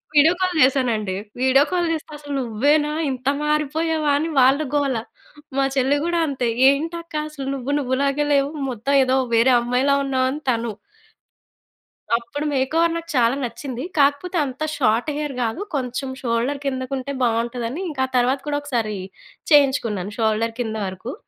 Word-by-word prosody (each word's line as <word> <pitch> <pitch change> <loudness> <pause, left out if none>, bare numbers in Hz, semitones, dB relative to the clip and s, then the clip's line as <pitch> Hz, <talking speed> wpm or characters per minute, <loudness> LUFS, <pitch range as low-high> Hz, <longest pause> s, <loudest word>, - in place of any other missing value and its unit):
Video 300 +3 +6
call 365 -1 +1
జేశానండి. 240 -7 +2 0.3
Video 260 +2 +5
call 350 -2 +1
జేస్తే 315 -1 -6
అసలు 290 -1 -7
నువ్వేనా 285 +6 +1 0.2
ఇంత 255 0 -6 0.2
మారిపోయావా 300 +1 0
అని 320 +2 -1
వాళ్ళ 265 +3 +5 0.2
గోల. 280 -3 +1 0.6
మా 275 - +3
చెల్లి 270 +2 +3
గూడా 340 0 +1
అంతే. 260 -4 -1 0.2
ఏంటి 310 +5 0
అక్క 335 -1 -13
అసలు 280 -3 -7
నువ్వు 270 +1 -4
నువ్వులాగే 275 +2 0
లేవు. 280 0 +2 0.2
మొత్తం 250 +4 -1
ఏదో 260 0 +2 0.2
వేరే 240 +3 +5
అమ్మాయిలా 250 +4 +2
ఉన్నావని 265 +2 0
తను. 230 -1 -2 1.4
అప్పుడు 240 +5 -5
మేక్‌ఓవర్ 320 +5 +2
నాకు 335 0 -6
చాలా 235 0 +4
నచ్చింది. 245 +2 -5
కాకపోతే 290 +6 +2
అంత 270 +1 -6
షార్ట్ 235 0 +1
హెయిర్ 295 -2 -3
గాదు. 230 +7 -1
కొంచెం 260 0 -2
షోల్డర్ 245 +3 -1
కిందకు 260 -1 -3
ఉంటే 265 +2 -4
బావుంటదదని. 235 +5 -1
ఇంకా 275 -4 -2
ఆ - - -19
తర్వాత 250 +3 +2
కూడా 290 -1 0
ఒకసారి 230 -7 -2 0.5
చేయించుకున్నాను. 235 - +3
షోల్డర్ 225 0 +1
కింద 220 -2 -2
వరకు. 190 +7 -6
270 Hz, 150 wpm, -22 LUFS, 240-290 Hz, 1.4 s, Video